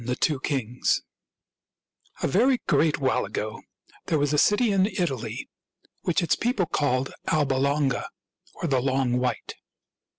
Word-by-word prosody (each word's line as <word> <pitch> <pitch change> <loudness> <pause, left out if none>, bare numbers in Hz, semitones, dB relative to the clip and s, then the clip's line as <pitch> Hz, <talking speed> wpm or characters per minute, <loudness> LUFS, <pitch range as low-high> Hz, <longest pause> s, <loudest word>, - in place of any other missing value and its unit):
THE 125 +1 -1
TWO 145 0 +1
KINGS 125 -3 -1 1.2
A - - +3
very 250 - +3
great 155 -1 +3
while 135 -2 +1
ago - - -4 0.5
there 160 - +2
was 145 0 +1
a 150 - +3
city 210 +5 +3
in 195 -1 +3
Italy 170 - -3 0.5
which 175 +1 +1
its 165 - +2
people 235 -6 0
called 135 -4 0
Alba 145 -4 +2
Longa, 140 0 +1 0.5
or - - -4
the 135 -4 +2
Long 130 -2 +1
White. 125 0 -2
145 Hz, 140 wpm, -26 LUFS, 130-175 Hz, 1.2 s, A